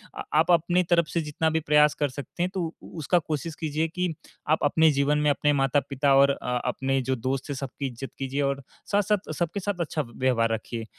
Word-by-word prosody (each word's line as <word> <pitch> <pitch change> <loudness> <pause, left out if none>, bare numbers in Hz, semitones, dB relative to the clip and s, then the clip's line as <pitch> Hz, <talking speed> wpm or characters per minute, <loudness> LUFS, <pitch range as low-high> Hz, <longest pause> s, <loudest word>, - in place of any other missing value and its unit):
अ, - - -5
आप 160 +3 +4
अपनी 175 +2 +3
तरफ 170 -2 +2
से 170 - -1
जितना 155 +1 -1
भी 160 0 +1
प्रयास 150 -1 +4
कर 145 -1 0
सकते 145 +6 -5
हैं, 180 - 0
तो 190 - -2 0.2
उ - - -13
उसका 160 +3 +2
कोशिश 155 0 -4
कीजिए 155 0 -1
कि 180 +1 -2 0.4
आप 155 - +3
अपने 160 +2 +4
जीवन 140 +1 +2
में 150 0 +2
अपने 145 +1 +2
माता-पिता 140 0 +1
और 140 +1 +6
अ, 125 -2 -2
अपने 135 +2 0
जो 130 +1 -1
दोस्त 130 +3 -3
हैं, 145 - -2
सबकी 135 +1 -4
इज़्ज़त 130 +1 -7
कीजिए 135 +1 -2
और 140 0 0 0.3
साथ-साथ, 205 -3 +1
सबके 175 +4 -2
साथ 200 -1 -3
अच्छा 160 -1 -1
व्यवहार 120 -2 0
रखिए। 115 +1 -4
150 Hz, 215 wpm, -26 LUFS, 135-165 Hz, 0.4 s, और